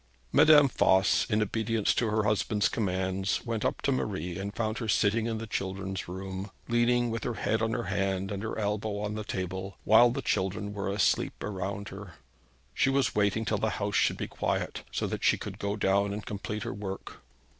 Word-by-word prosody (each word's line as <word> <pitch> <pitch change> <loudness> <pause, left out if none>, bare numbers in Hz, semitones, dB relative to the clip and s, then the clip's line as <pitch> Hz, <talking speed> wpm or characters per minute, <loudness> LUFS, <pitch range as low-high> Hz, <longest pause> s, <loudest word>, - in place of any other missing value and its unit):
Madame 150 -2 +7
Voss, 95 -6 +3
in 105 0 +2
obedience 110 0 0
to 115 - +1
her 110 0 +1
husband's 105 0 +1
commands, 95 -2 -1
went 115 -3 -2
up - - -1
to 140 - +2
Marie 95 - -2
and 100 +2 -5
found 110 -1 -1
her 115 - -3
sitting 110 +2 +2
in 115 -1 -2
the 115 - -5
children's 95 -3 -4
room, 95 +2 -5 0.2
leaning 120 0 +2
with 115 0 -3
her 120 - -2
head 110 0 0
on 115 0 0
her 120 - -1
hand 95 -1 -1
and 100 -1 -3
her 115 - -4
elbow 105 0 -1
on 105 0 -3
the 110 0 -4
table, 95 0 -4
while 120 +2 +7
the 120 - -3
children 100 +2 -1
were 100 -1 -3
asleep 100 0 +2
around 100 0 -4
her. 95 -3 -9 0.6
She - - +2
was 135 0 +2
waiting 105 +1 +1
till 105 -1 0
the 110 - +1
house 100 0 -2
should - - +3
be - - -3
quiet, - - -2
so - - -1
that - - -4
she - - +4
could - - -7
go 100 +1 -1
down 100 0 +2
and 105 0 -6
complete 105 +1 -4
her - - -4
work. 95 -1 -7
105 Hz, 200 wpm, -29 LUFS, 95-110 Hz, 0.6 s, Madame